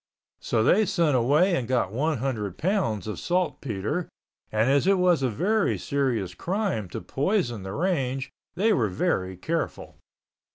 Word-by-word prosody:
So 110 Hz, -2 st, 0 dB
they 200 Hz, -, +4 dB
sent 165 Hz, -6 st, +2 dB
away 150 Hz, +10 st, +3 dB
and 125 Hz, -6 st, -2 dB
got 125 Hz, -7 st, +1 dB
one 150 Hz, +7 st, 0 dB
hundred 110 Hz, -7 st, -3 dB
pounds 165 Hz, -, 0 dB
of 105 Hz, -, -5 dB
saltpeter 155 Hz, -, -2 dB, 0.4 s
and 110 Hz, +2 st, +2 dB
as 140 Hz, +5 st, +3 dB
it 195 Hz, 0 st, +5 dB
was 180 Hz, -4 st, +3 dB
a 130 Hz, -, +1 dB
very 200 Hz, -, +1 dB
serious 125 Hz, -10 st, -1 dB
crime 180 Hz, -, -2 dB
to -, -, -6 dB
poison 135 Hz, -, -1 dB
the 95 Hz, +1 st, -6 dB
range, 135 Hz, -, -1 dB, 0.2 s
they 215 Hz, +4 st, +3 dB
were 115 Hz, -, +1 dB
very 95 Hz, 0 st, -1 dB
careful. 165 Hz, -, -4 dB
135 Hz, 155 wpm, -26 LUFS, 110-180 Hz, 0.4 s, it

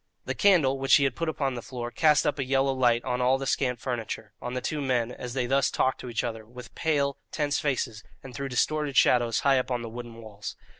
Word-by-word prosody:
The -, -, -2 dB
candle, 155 Hz, -10 st, +3 dB
which 135 Hz, 0 st, +5 dB
he 140 Hz, -, +4 dB
had 135 Hz, -2 st, +1 dB
put 165 Hz, -1 st, -2 dB
upon 140 Hz, -4 st, -1 dB
the 120 Hz, -, -5 dB
floor, 120 Hz, -1 st, -6 dB
cast 150 Hz, +4 st, +3 dB
up 145 Hz, -, 0 dB
a -, -, +1 dB
yellow 135 Hz, +1 st, +1 dB
light 120 Hz, -2 st, +2 dB
on 125 Hz, -1 st, -1 dB
all 130 Hz, +2 st, +3 dB
the 135 Hz, -, -5 dB
scant 125 Hz, -3 st, 0 dB
furniture, 115 Hz, -4 st, -5 dB
on 125 Hz, +1 st, -5 dB
the -, -, 0 dB
two 150 Hz, +3 st, -3 dB
men 125 Hz, -3 st, 0 dB
as 125 Hz, 0 st, -7 dB
they 125 Hz, -2 st, 0 dB
thus 135 Hz, +2 st, +2 dB
talked 130 Hz, -, 0 dB
to 125 Hz, -, -7 dB
each 115 Hz, -, -2 dB
other, 115 Hz, -2 st, -4 dB
with 120 Hz, +2 st, -12 dB
pale, 140 Hz, -4 st, 0 dB
tense 145 Hz, -1 st, 0 dB
faces, 125 Hz, -6 st, -2 dB, 0.2 s
and 130 Hz, -, -10 dB
threw 140 Hz, +1 st, -4 dB
distorted 145 Hz, +2 st, 0 dB
shadows 120 Hz, -2 st, +4 dB
high 135 Hz, -2 st, +4 dB
up 130 Hz, -, -3 dB
on 120 Hz, -2 st, -2 dB
the 115 Hz, -, -6 dB
wooden 120 Hz, 0 st, -8 dB
walls. 110 Hz, -3 st, -8 dB
130 Hz, 245 wpm, -27 LUFS, 120-140 Hz, 0.2 s, which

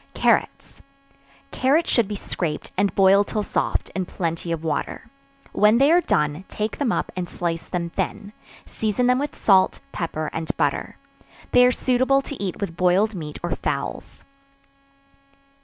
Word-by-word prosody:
Carrots. -, -, 0 dB, 0.7 s
Carrots 290 Hz, +6 st, +2 dB
should 235 Hz, -5 st, +3 dB
be 210 Hz, -, -4 dB
scraped, 165 Hz, -5 st, -4 dB
and 200 Hz, +1 st, +1 dB
boiled 195 Hz, +1 st, +5 dB
till 210 Hz, -, -2 dB
soft, -, -, -1 dB
in 185 Hz, -2 st, -3 dB
plenty 170 Hz, -1 st, -3 dB
of 165 Hz, -1 st, -3 dB
water; 160 Hz, -, -3 dB, 0.5 s
when 210 Hz, +2 st, +4 dB
they 275 Hz, +4 st, +5 dB
are 350 Hz, +1 st, +5 dB
done, 150 Hz, -, 0 dB
take 215 Hz, +1 st, -4 dB
them 275 Hz, -6 st, +1 dB
up, -, -, -2 dB
and 180 Hz, -2 st, -4 dB
slice 165 Hz, -2 st, -3 dB
them 170 Hz, -2 st, -3 dB
thin; 205 Hz, +4 st, -4 dB, 0.3 s
season 220 Hz, +3 st, -1 dB
them 250 Hz, +1 st, +3 dB
with 290 Hz, 0 st, -3 dB
salt, 190 Hz, -2 st, +3 dB
pepper 155 Hz, -2 st, -3 dB
and 160 Hz, -1 st, -3 dB
butter. -, -, -1 dB, 0.5 s
They 250 Hz, 0 st, +6 dB
are -, -, +4 dB
suitable 260 Hz, +2 st, +2 dB
to 270 Hz, -7 st, -6 dB
eat 185 Hz, -3 st, -4 dB
with 185 Hz, -5 st, -4 dB
boiled 185 Hz, +5 st, +2 dB
meat 155 Hz, -5 st, -6 dB
or 175 Hz, -, -2 dB
fowls. -, -, -4 dB
195 Hz, 155 wpm, -23 LUFS, 170-245 Hz, 0.7 s, They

